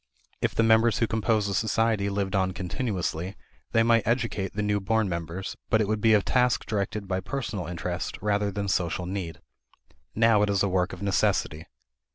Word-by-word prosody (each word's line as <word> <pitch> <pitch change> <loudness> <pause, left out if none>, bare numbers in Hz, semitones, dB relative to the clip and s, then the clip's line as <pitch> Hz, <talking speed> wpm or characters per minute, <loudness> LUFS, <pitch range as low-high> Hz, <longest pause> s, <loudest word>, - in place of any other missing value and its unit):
If - - 0
the 115 - +3
members 115 -1 +4
who 115 - +2
compose 110 -1 0
a 100 - -2
society 110 0 +1
lived 100 0 -2
on 95 -1 +1
continuously, 95 - -3 0.4
they 115 - +4
might 115 -2 +3
educate 115 -5 -1
the 105 - -1
new 105 0 +1
born 110 +2 +1
members, 85 +1 -4
but 110 - +3
it 105 - +1
would 110 0 -1
be 110 0 +5
a 105 - +3
task 125 -2 +2
directed 100 -1 -2
by 95 0 -1
personal 100 -2 -4
interest 90 +1 -4
rather 105 0 0
than 100 +1 -3
social 90 -1 -1
need. 90 -3 -5 0.7
Now 115 -1 +4
it 105 - +2
is 100 -1 +2
a - - +2
work 90 -1 0
of 95 +2 -8
necessity. 95 -5 0
100 Hz, 190 wpm, -26 LUFS, 95-110 Hz, 0.7 s, be